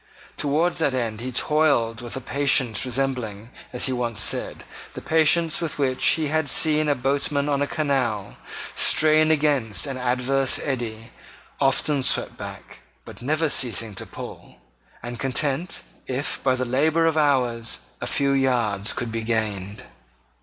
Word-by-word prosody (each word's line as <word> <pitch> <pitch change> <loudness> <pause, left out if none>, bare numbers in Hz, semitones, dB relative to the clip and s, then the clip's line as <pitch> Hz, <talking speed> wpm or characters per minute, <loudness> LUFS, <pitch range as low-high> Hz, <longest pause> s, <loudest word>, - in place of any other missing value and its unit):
Towards 160 +5 0
that 140 -5 +1
end 115 -3 -3
he 130 +1 -4
toiled 130 -5 +1
with 120 -1 -7
a - - -5
patience 130 -4 +1
resembling, 125 -4 -3 0.2
as 125 - +3
he 130 - +1
once 120 -4 -2
said, - - +1 0.3
the - - -5
patience 160 +1 +3
with 165 -3 -3
which 130 -3 -1
he 155 -2 -2
had 155 -1 0
seen 155 +1 +4
a 145 - +2
boatman 140 +2 -1
on 140 -1 0
a 145 - +1
canal, 135 - -2 0.4
strain 155 0 +4
against 140 - +1
an 135 -2 -5
adverse 130 +2 +1
eddy, 120 -4 -5 0.5
often 140 +1 +2
swept 130 - +2
back, - - -10 0.3
but - - -12
never 155 +5 0
ceasing 115 -6 +1
to - - -6
pull, - - -10 0.5
and 120 -1 -7
content 140 +6 -1 0.2
if, 130 +3 -3
by 130 -1 +2
the 130 0 -2
labour 155 +6 +1
of 165 -1 +2
hours, 125 - 0 0.2
a - - -3
few 140 0 +1
yards 120 -7 0
could 120 -1 -4
be 115 0 -3
gained. 105 -3 -3
130 Hz, 155 wpm, -23 LUFS, 120-145 Hz, 0.5 s, seen